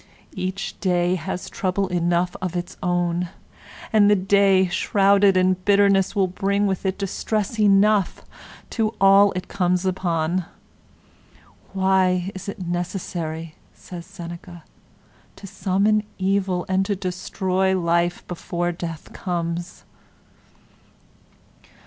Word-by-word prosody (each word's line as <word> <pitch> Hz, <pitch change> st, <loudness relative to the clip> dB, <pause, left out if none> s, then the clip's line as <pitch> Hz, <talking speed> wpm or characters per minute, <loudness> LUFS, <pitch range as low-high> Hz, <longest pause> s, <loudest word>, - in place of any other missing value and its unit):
'Each 190 Hz, +2 st, -4 dB
day 180 Hz, -2 st, +1 dB
has 185 Hz, 0 st, -4 dB
trouble 190 Hz, +1 st, -1 dB
enough 175 Hz, 0 st, 0 dB
of 185 Hz, -2 st, -3 dB
its 175 Hz, 0 st, -4 dB
own,' 175 Hz, -1 st, 0 dB, 0.6 s
and 205 Hz, -2 st, +5 dB
the 205 Hz, -, +6 dB
day, 195 Hz, 0 st, +3 dB
shrouded 195 Hz, +1 st, +3 dB
in 185 Hz, 0 st, +4 dB
bitterness, 200 Hz, 0 st, +3 dB
will 195 Hz, -2 st, +3 dB
bring 200 Hz, +2 st, 0 dB
with 190 Hz, -1 st, -1 dB
it 190 Hz, -, -1 dB
distress 210 Hz, +2 st, -2 dB
enough 205 Hz, -1 st, +3 dB, 0.5 s
to 225 Hz, -1 st, -1 dB
all 195 Hz, +1 st, +6 dB
it 185 Hz, 0 st, -5 dB
comes 180 Hz, -1 st, 0 dB
upon. 175 Hz, -2 st, -1 dB, 1.3 s
'Why 190 Hz, -1 st, +2 dB
is 190 Hz, +1 st, -7 dB
it 195 Hz, -2 st, -6 dB
necessary,' 170 Hz, -2 st, -4 dB, 0.2 s
says 175 Hz, -1 st, -10 dB
Seneca, 175 Hz, -2 st, -9 dB, 0.7 s
'to -, -, -12 dB
summon 200 Hz, +2 st, +1 dB, 0.2 s
evil' 190 Hz, -2 st, 0 dB
and 190 Hz, 0 st, +1 dB
to 205 Hz, -, 0 dB
destroy 190 Hz, 0 st, -1 dB
life 170 Hz, 0 st, 0 dB
before 175 Hz, 0 st, -3 dB
death 165 Hz, -2 st, -7 dB
comes? 170 Hz, -1 st, -4 dB
185 Hz, 110 wpm, -22 LUFS, 175-195 Hz, 1.3 s, the